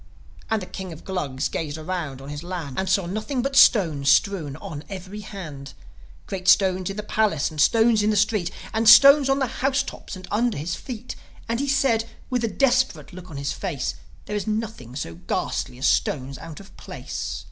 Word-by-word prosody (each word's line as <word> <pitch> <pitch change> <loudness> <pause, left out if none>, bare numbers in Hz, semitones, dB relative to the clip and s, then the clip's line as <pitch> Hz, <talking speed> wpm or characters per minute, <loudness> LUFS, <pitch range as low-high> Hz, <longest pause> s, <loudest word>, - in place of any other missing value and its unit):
And 220 -3 0
the - - -6
King 190 -1 -7
of 160 - -10
the - - -22
Glugs 145 -8 -2
gazed 155 -2 -4
around 155 -5 -4
on 140 - -9
his 145 0 -6
land, 175 -6 -5
And 190 0 -1
saw 190 -1 +2
nothing 215 +8 -3
but 275 0 -2
stones 160 - +5
strewn 150 -1 +2
on 150 0 -8
every 195 +1 -7
hand: 155 -10 -8 0.5
Great 185 -1 -6
stones 185 -1 +4
in 195 - -6
the 210 - -3
palace, 205 -9 +1
and 155 -2 -2
stones 225 +4 +4
in 210 - +2
the 215 - +2
street, 205 -3 +1 0.2
And 220 0 +4
stones 275 +3 +9
on 270 - +3
the 270 - +1
house 270 +2 0
tops 270 - -8
and 185 0 -10
under 230 +2 +1
the 145 - -5
feet. 220 +8 -5 0.3
And 230 +1 -1
he 280 - -1
said, 270 -5 +2 0.3
with 250 -2 0
a - - +2
desperate 245 - +1
look 180 0 -10
on 150 - -8
his 140 0 -2
face, 170 -9 -3 0.3
"There 210 - -4
is 205 -1 -3
nothing 215 - -4
so 85 - -4
ghastly 90 +7 -3
as 130 - -3
stones 135 -1 0
out 160 -2 -9
of 200 0 -15
place. - - -6
190 Hz, 205 wpm, -24 LUFS, 155-225 Hz, 0.5 s, stones